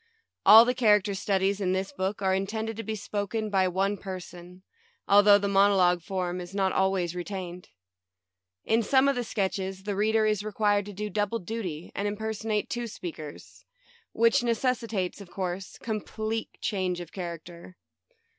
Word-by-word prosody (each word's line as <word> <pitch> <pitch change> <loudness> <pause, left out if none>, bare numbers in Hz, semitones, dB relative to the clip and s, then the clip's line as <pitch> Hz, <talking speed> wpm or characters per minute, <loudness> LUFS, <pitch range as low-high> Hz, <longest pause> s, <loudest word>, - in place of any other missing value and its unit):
All 220 +3 +10
the 250 - +1
character 210 -5 +3
studies 195 +1 0
in 185 -1 +1
this 190 +1 -2
book 190 +2 -3
are 190 0 +2
intended 220 +4 -2
to - - -3
be 220 0 -4
spoken 210 +1 -3
by 190 -2 +3
one 195 +3 0
person, 180 -1 -9 0.4
al 200 +1 +7
though 205 0 +7
the 200 0 -1
monologue 195 -3 +4
form 180 0 -3
is 175 +2 -9
not 190 -1 +1
always 190 -3 +1
retained. 180 -1 -6 1.0
In 225 +1 +3
some 265 +4 +3
of 280 - +2
the 245 - -1
sketches 190 -3 -3
the 205 0 -3
reader 215 +2 +2
is 210 -2 +1
required 205 -1 +1
to 205 - -7
do 210 +2 -5
double 205 +3 0
duty 185 -6 -5
and 200 +2 -2
imperson 220 +1 -4
ate 210 -1 0
two 240 -1 -3
speakers, 160 -7 -9 0.5
which 230 +4 +3
necessitates, 230 -5 -1
of 195 - -11
course, 185 0 -5
complete 220 0 -3
change 185 -4 -1
of 175 -2 -8
character. 170 0 -8
200 Hz, 165 wpm, -27 LUFS, 185-215 Hz, 1.0 s, All